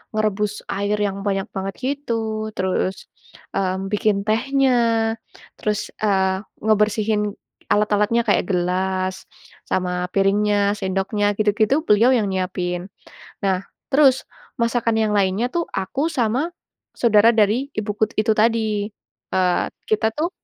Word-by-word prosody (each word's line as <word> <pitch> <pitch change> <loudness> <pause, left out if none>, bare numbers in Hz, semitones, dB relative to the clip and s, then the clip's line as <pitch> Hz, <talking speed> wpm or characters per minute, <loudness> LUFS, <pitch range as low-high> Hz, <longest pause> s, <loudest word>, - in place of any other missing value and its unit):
merebus 210 -1 -1
air 200 +1 0
yang 200 -1 -1
banyak 195 0 0
banget 195 0 -4
gitu, 225 -6 -2
terus, 185 0 -1 0.5
mmm, 190 0 -1
bikin 205 -1 +1
tehnya, 260 +5 +2 0.9
terus, 210 -1 -2
eee, 190 -2 +1 0.2
ngebersihin 210 -1 +1 0.3
alat-alatnya 210 +2 +2
kayak 210 - +1
gelas, 185 +1 -1 0.4
sama 180 -1 -1
piringnya, 200 +1 +3
sendoknya, 200 +2 0
gitu-gitu, 215 +8 +2
beliau 235 +1 +4
yang 210 -5 0
nyiapin. 180 -1 -2 0.5
Nah 190 -1 0 0.3
terus 270 -2 +5 0.4
masakan 230 -1 +1
yang 210 -1 +1
lainnya 200 +4 +2
tuh 340 +3 -1
aku 275 - -2
sama 250 +7 0 0.4
saudara 225 -1 +5
dari 225 +6 +2
ibuku 215 +1 -1
itu 215 0 +2
tadi. 215 -2 +1 0.4
Eee, 185 -1 +2 0.2
kita 220 +1 +1
tuh 310 +8 -1
210 Hz, 115 wpm, -21 LUFS, 195-225 Hz, 0.9 s, terus